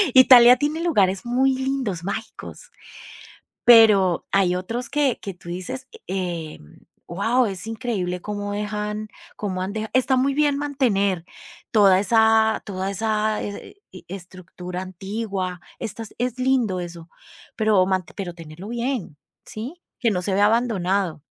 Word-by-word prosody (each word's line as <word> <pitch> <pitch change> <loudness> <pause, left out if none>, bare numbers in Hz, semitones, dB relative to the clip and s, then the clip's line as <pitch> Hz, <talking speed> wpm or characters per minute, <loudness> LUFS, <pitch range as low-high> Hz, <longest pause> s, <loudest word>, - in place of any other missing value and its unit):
Italia 250 -1 +9
tiene 300 +2 -1
lugares 195 - +1
muy 260 +2 +2
lindos, 260 -10 -2
mágicos. 225 - -6 1.0
Pero 210 -7 +6
hay 185 -2 +2
otros 230 +7 -4
que 280 -3 +1
que 195 - -6
tú 175 -1 -13
dices, 185 +9 -6 0.2
eh, 175 -5 -4
mm, 75 - -19 0.2
wao, 225 +7 +1
es 190 -1 -6
increíble 220 -6 -3
cómo 205 0 -4
dejan 210 +1 -4 0.3
cómo 190 -3 -3
han 195 - -4
deja 220 0 -4
Está 260 +1 +3
muy 275 +2 +1
bien 295 -1 +2
mantener 210 - 0 0.5
toda 200 -4 +5
esa 220 +1 +3
toda 195 -1 -4
esa 215 +1 -1
e 205 - -8
e 185 - -12
estructura 180 -1 -8
antigua, 190 0 -4 0.2
estas 225 0 -6
es 250 0 -2
lindo 250 -7 +1
eso, 170 -1 -8 0.5
pero 215 -4 +3
mante 185 -3 -2
pero 180 -4 -6
tenerlo 165 +3 -10
bien, 235 - -3 0.3
¿sí? 265 +11 -8 0.2
Que 235 -5 +2
no 180 -3 -1
se 190 +1 -1
vea 205 +1 +4
abandonado. 200 -7 0
210 Hz, 140 wpm, -23 LUFS, 185-240 Hz, 1.0 s, Italia